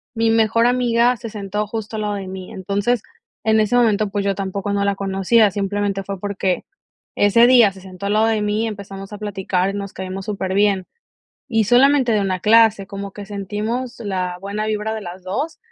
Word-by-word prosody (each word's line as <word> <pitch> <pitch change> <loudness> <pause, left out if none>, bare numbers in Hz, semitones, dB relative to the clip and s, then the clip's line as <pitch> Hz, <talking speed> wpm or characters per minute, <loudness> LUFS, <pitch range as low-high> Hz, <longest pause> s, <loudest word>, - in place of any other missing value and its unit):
mi 225 0 +2
mejor 225 +1 +3
amiga 245 0 +2
se 230 0 -7
sentó 210 0 -3
justo 220 +1 -5
al 215 - -2
lado 210 0 -1
de 195 -2 -5
mí. 185 -1 -8
Entonces, 200 +5 -1 0.4
en 220 0 +3
ese 215 +2 +2
momento, 215 -4 +3
pues, 200 0 -1
yo 200 -1 0
tampoco 195 +1 -3
no 200 0 0
la 200 - +2
conocía, 195 +3 +3
simplemente 200 0 -2
fue 195 -1 -6
porque 195 -2 -2 0.5
ese 230 +4 +5
día 240 -6 +6
se 190 0 -14
sentó 185 +1 -9
al 200 - 0
lado 220 +1 +3
de 220 -1 +1
mí 210 +1 0
y - - 0
empezamos 195 -1 -8
a - - -6
platicar 195 -2 -1
y - - -9
nos 200 -1 -5
caímos 190 0 -6
súper 195 -3 -3
bien, 200 -2 +2 0.6
y 225 -2 +2
solamente 250 +2 +4
de 210 - +2
una 185 -2 -1
clase, 215 -1 +4
como 200 0 -7
que 205 - -8
sentimos 210 +5 -4
la 185 -4 -2
buena 205 +2 -3
vibra 215 0 -2
de 220 - -4
las 180 0 -8
2, 295 - -3
205 Hz, 205 wpm, -20 LUFS, 195-225 Hz, 0.6 s, día